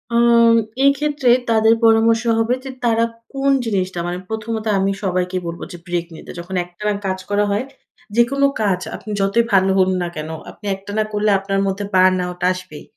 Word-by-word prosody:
আম 235 Hz, -1 st, +5 dB, 0.3 s
এক্ষেত্রে 280 Hz, -1 st, +2 dB, 0.2 s
তাদের 220 Hz, 0 st, +4 dB
পরামর্শ 225 Hz, +1 st, +4 dB, 0.2 s
হবে 230 Hz, +2 st, +1 dB
যে, 270 Hz, -, -7 dB, 0.2 s
তারা 230 Hz, -1 st, +3 dB, 0.3 s
কোন 275 Hz, 0 st, +1 dB
জিনিসটা 190 Hz, -5 st, -1 dB
মানে 175 Hz, +1 st, -3 dB
প্রথমত 220 Hz, 0 st, -4 dB
আমি 195 Hz, +1 st, +1 dB
সবাইকেই 185 Hz, -1 st, -1 dB
বলবো 170 Hz, 0 st, -6 dB
যে, 175 Hz, -, -8 dB
ব্রেক 175 Hz, -1 st, -1 dB
নিতে। -, -, -10 dB
যখন 175 Hz, +2 st, -6 dB
একটানা 210 Hz, +4 st, -3 dB
কাজ 190 Hz, 0 st, -1 dB
করা 205 Hz, 0 st, +2 dB
হয়। 205 Hz, +5 st, -1 dB, 0.5 s
যেকোনো 270 Hz, +4 st, +3 dB, 0.2 s
কাজ, 195 Hz, -4 st, +1 dB, 0.2 s
আপনি 215 Hz, -, -10 dB
যতই 200 Hz, +4 st, +2 dB
ভালো 190 Hz, 0 st, +4 dB
হন 190 Hz, 0 st, +4 dB
না 175 Hz, -, -1 dB
কেনো, 155 Hz, +1 st, -5 dB, 0.2 s
আপনি 210 Hz, -, -16 dB
একটানা 205 Hz, +2 st, -3 dB
করলে 210 Hz, +1 st, +1 dB
আপনার 195 Hz, 0 st, -2 dB
মধ্যে 195 Hz, +1 st, -2 dB
বার্ন 185 Hz, 0 st, +5 dB
আউট 180 Hz, 0 st, -8 dB
আসবেই। 185 Hz, -4 st, -8 dB
205 Hz, 175 wpm, -19 LUFS, 185-230 Hz, 0.5 s, আম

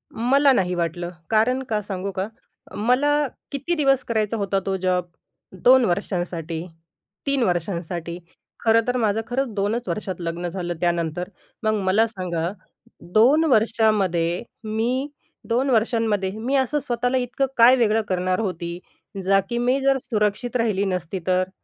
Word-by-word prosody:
मला 275 Hz, +5 st, +4 dB
नाही 180 Hz, -6 st, +1 dB
वाटलं. 175 Hz, 0 st, -2 dB, 0.2 s
कारण 235 Hz, +4 st, +2 dB
का 215 Hz, -2 st, 0 dB
सांगू 195 Hz, -1 st, -4 dB
का? 190 Hz, +1 st, -3 dB, 0.5 s
मला 285 Hz, +6 st, +2 dB, 0.2 s
किती 285 Hz, +5 st, -2 dB
दिवस 275 Hz, -4 st, +2 dB
करायचा 220 Hz, -1 st, -1 dB
होता 200 Hz, -1 st, 0 dB
तो 195 Hz, -, 0 dB
जॉब? 180 Hz, -1 st, 0 dB, 0.6 s
2 255 Hz, -1 st, +7 dB
वर्षांसाठी, 175 Hz, -3 st, -2 dB, 0.6 s
3 275 Hz, -3 st, +1 dB
वर्षांसाठी. 170 Hz, -1 st, -2 dB, 0.5 s
खरं 225 Hz, 0 st, +5 dB
तर 250 Hz, -, +1 dB
माझं 220 Hz, -2 st, +1 dB
खरंच 250 Hz, -1 st, -1 dB
2च 215 Hz, +5 st, -1 dB
वर्षात 195 Hz, -3 st, -3 dB
लग्न 170 Hz, +1 st, -3 dB
झालं 175 Hz, -1 st, -3 dB
त्यानंतर. 175 Hz, +1 st, -1 dB, 0.3 s
मग 215 Hz, 0 st, +2 dB
मला 200 Hz, +4 st, +3 dB
सांगा, 180 Hz, -5 st, -3 dB, 0.6 s
2 265 Hz, +9 st, +5 dB
वर्षामध्ये 210 Hz, -6 st, +2 dB, 0.2 s
मी 230 Hz, +5 st, -1 dB, 0.4 s
2 250 Hz, +4 st, +1 dB
वर्षांमध्ये 220 Hz, -5 st, +1 dB
मी 255 Hz, +5 st, -1 dB
असं 270 Hz, +3 st, +1 dB
स्वतःला 245 Hz, -1 st, -1 dB
इतकं 250 Hz, +2 st, 0 dB
काय 240 Hz, +2 st, +8 dB
वेगळं 225 Hz, -3 st, +2 dB
करणार 185 Hz, -1 st, 0 dB
होती, 175 Hz, -4 st, -3 dB, 0.4 s
जा 195 Hz, +1 st, +4 dB
की 235 Hz, -, -2 dB
मी 250 Hz, +3 st, +2 dB
जर 270 Hz, 0 st, +3 dB
सुरक्षित 215 Hz, +2 st, 0 dB
राहिली 215 Hz, -5 st, +1 dB
नसती 180 Hz, 0 st, -2 dB
तर? 185 Hz, 0 st, +2 dB
215 Hz, 140 wpm, -23 LUFS, 180-245 Hz, 0.6 s, काय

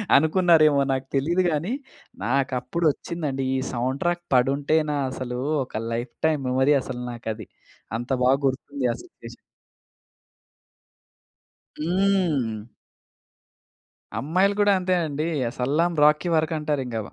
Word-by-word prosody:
అనుకున్నారేమో 155 Hz, -2 st, +5 dB
నాకు 130 Hz, 0 st, -2 dB
తెలియదు 170 Hz, +7 st, +2 dB
గాని 165 Hz, -, -1 dB, 0.5 s
నాకు 135 Hz, +2 st, +1 dB
అప్పుడొచ్చిందండి. 150 Hz, 0 st, -2 dB
ఈ -, -, +1 dB
సౌండ్ 130 Hz, +3 st, -2 dB
ట్రాక్ 175 Hz, 0 st, 0 dB
పడుంటేనా 145 Hz, +4 st, +2 dB, 0.2 s
అసలు 125 Hz, -1 st, -5 dB, 0.3 s
ఒక 110 Hz, -, -5 dB
లైఫ్ 120 Hz, +1 st, -3 dB, 0.2 s
టైమ్ 155 Hz, -3 st, 0 dB
మెమరీ 130 Hz, +3 st, +3 dB
అసలు 125 Hz, -1 st, -6 dB
నాకు 115 Hz, -1 st, -6 dB
అది. 110 Hz, -2 st, -10 dB, 0.5 s
అంత 120 Hz, +2 st, -7 dB, 0.2 s
బాగా 135 Hz, +2 st, +5 dB
గుర్తుంది. 135 Hz, 0 st, -3 dB
ఆ -, -, -7 dB
సిట్యుయేషన్. -, -, -13 dB, 2.5 s
హ్మ్. 165 Hz, -, +1 dB, 1.5 s
అమ్మాయిలు 185 Hz, +7 st, +2 dB
కూడా 205 Hz, -1 st, +5 dB
అంతేనండి. 165 Hz, -4 st, 0 dB, 0.2 s
అ -, -, -8 dB
'సలాం 155 Hz, +7 st, +1 dB
రాఖీ' 150 Hz, +3 st, +4 dB
వరకు 160 Hz, +1 st, +1 dB
అంటారు 150 Hz, -2 st, -1 dB
ఇంకా. 115 Hz, -2 st, -3 dB
145 Hz, 115 wpm, -24 LUFS, 130-170 Hz, 2.5 s, అనుకున్నారేమో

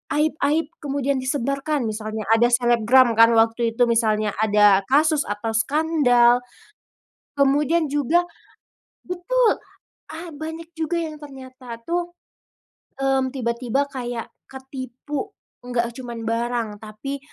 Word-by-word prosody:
aib-aib 305 Hz, +1 st, +1 dB
kemudian 280 Hz, -1 st, -1 dB
disebarkan 275 Hz, +2 st, -1 dB
misalnya 215 Hz, 0 st, -4 dB
ada 225 Hz, +1 st, +5 dB
selebgram 240 Hz, 0 st, +4 dB
kan 230 Hz, +1 st, +7 dB
waktu 225 Hz, 0 st, +2 dB
itu 240 Hz, 0 st, +2 dB
misalnya 215 Hz, -2 st, +1 dB
ada 210 Hz, -2 st, +5 dB
kasus 300 Hz, +2 st, +3 dB
atau 205 Hz, +2 st, -3 dB
skandal, 245 Hz, -2 st, +3 dB, 1.0 s
kemudian 295 Hz, +3 st, +2 dB
juga, 295 Hz, +4 st, +2 dB, 0.8 s
betul, 435 Hz, +7 st, +1 dB, 0.6 s
ah, 335 Hz, +2 st, -7 dB
banyak 320 Hz, +2 st, -7 dB
juga 325 Hz, +2 st, -1 dB
yang 315 Hz, -2 st, -5 dB
ternyata 260 Hz, -4 st, -10 dB
tuh, 345 Hz, 0 st, -2 dB, 0.9 s
hmm, 270 Hz, -1 st, +1 dB
tiba-tiba 245 Hz, +2 st, -1 dB
kayak 245 Hz, -3 st, -5 dB, 0.2 s
ketipu 265 Hz, -, -6 dB, 0.3 s
enggak 240 Hz, -1 st, -2 dB
cuman 235 Hz, -3 st, -7 dB
barang, 235 Hz, 0 st, -1 dB
tapi 220 Hz, +7 st, -6 dB
260 Hz, 105 wpm, -22 LUFS, 230-295 Hz, 1.0 s, kan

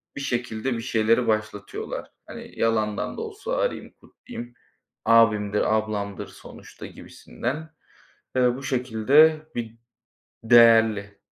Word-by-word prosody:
bir 140 Hz, -, -5 dB
şekilde 120 Hz, -1 st, -2 dB
bir 115 Hz, -, -4 dB
şeyleri 115 Hz, +2 st, +1 dB
başlatıyorlar. 110 Hz, -2 st, -4 dB, 0.2 s
Hani, -, -, -11 dB
"Yalandan 110 Hz, -2 st, -1 dB
da -, -, -4 dB
olsa 445 Hz, +3 st, -5 dB
arayayım, -, -, -3 dB
kutlayayım, 120 Hz, -, -11 dB, 0.5 s
abimdir, 110 Hz, -2 st, +3 dB
ablamdır 105 Hz, -2 st, -3 dB
sonuçta," -, -, -13 dB
gibisinden. 150 Hz, +7 st, -7 dB, 0.7 s
Eee, 125 Hz, -1 st, +3 dB
bu 135 Hz, -, -9 dB
şekilde 135 Hz, +5 st, +3 dB
bir 115 Hz, -1 st, -5 dB, 0.7 s
değerli. 115 Hz, -3 st, +5 dB
115 Hz, 105 wpm, -24 LUFS, 110-130 Hz, 0.7 s, değerli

